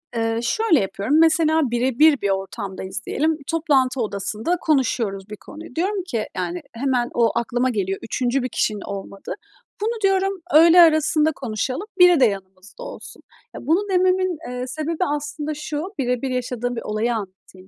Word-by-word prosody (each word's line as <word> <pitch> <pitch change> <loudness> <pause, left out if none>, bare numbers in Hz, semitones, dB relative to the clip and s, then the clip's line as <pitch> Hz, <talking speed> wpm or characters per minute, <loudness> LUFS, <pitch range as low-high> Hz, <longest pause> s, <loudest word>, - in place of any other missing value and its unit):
Eee, 225 0 0
şöyle 395 - +2
yapıyorum. 200 +9 0
Mesela, 320 -1 +4
birebir 265 +5 +3
bir 200 - 0
ortamdayız 195 0 -4
diyelim. 315 +1 0
Toplantı 270 -6 +1
odasında 215 - -2
konuşuyoruz 225 -9 0
bir 210 - -7
konuyu. 315 +8 -12
Diyorum 380 +3 -1
ki, 230 - -2
yani, 180 -1 -3
hemen 250 0 0
o 230 -2 +3
aklıma 245 +2 0
geliyor, 195 -5 -2
3. 250 +2 -1
bir 255 - -2
kişinin 210 -2 -1
olmadığı. 195 0 -7 0.5
Bunu 450 +1 -2
diyorum, 390 -1 +1
öğle 335 +3 +8
arasında 315 -1 +4
konuşalım, 255 - -3
biri 355 -3 +7
de 255 - +6
yanımızda 195 - -5
olsun. - - -9 0.3
Ya, - - -7
bunu 350 +10 +1
dememin, 370 -2 +2
eee, 250 0 -4
sebebi 310 +6 -2
aslında 295 +1 -5
şu, 300 0 -4 0.2
birebir 250 +1 -1
yaşadığım 245 -1 -3
bir 230 - -4
olayı 215 +3 -1
anlatayım 190 -2 -9
255 Hz, 155 wpm, -22 LUFS, 215-320 Hz, 0.5 s, öğle